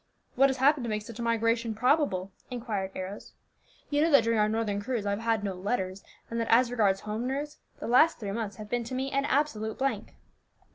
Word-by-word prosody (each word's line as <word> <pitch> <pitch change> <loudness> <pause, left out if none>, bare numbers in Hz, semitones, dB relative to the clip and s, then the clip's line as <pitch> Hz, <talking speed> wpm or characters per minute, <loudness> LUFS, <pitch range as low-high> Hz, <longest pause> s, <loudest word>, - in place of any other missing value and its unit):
"What 275 +2 +5
has 265 - -1
happened 275 +1 +3
to - - -3
make 210 -1 -2
such 230 +1 -10
a - - -2
migration 230 0 +1
probable?" 230 - +1 0.2
inquired 225 -6 -3
Arrows. 190 +2 -7 0.6
"You 290 0 +2
know 325 - +4
that 280 -6 +6
during 230 -1 +1
our 210 0 +3
northern 215 -2 -1
cruise 230 -1 -2
I 200 - 0
have 200 - -1
had 225 -2 0
no 200 -2 -2
letters, 190 0 -3 0.2
and 230 - -3
that 230 - -1
as 240 +1 +5
regards 200 -5 +2
home 215 +3 -3
news, 290 +3 -4 0.2
the - - -7
last 255 +8 +5
three 205 -3 -4
months 210 -1 -3
have 210 +1 -9
been 240 +2 -1
to 255 - -5
me 265 +1 -2
an 275 0 +1
absolute 255 -7 0
blank." 265 -6 -2
230 Hz, 225 wpm, -28 LUFS, 210-260 Hz, 0.6 s, that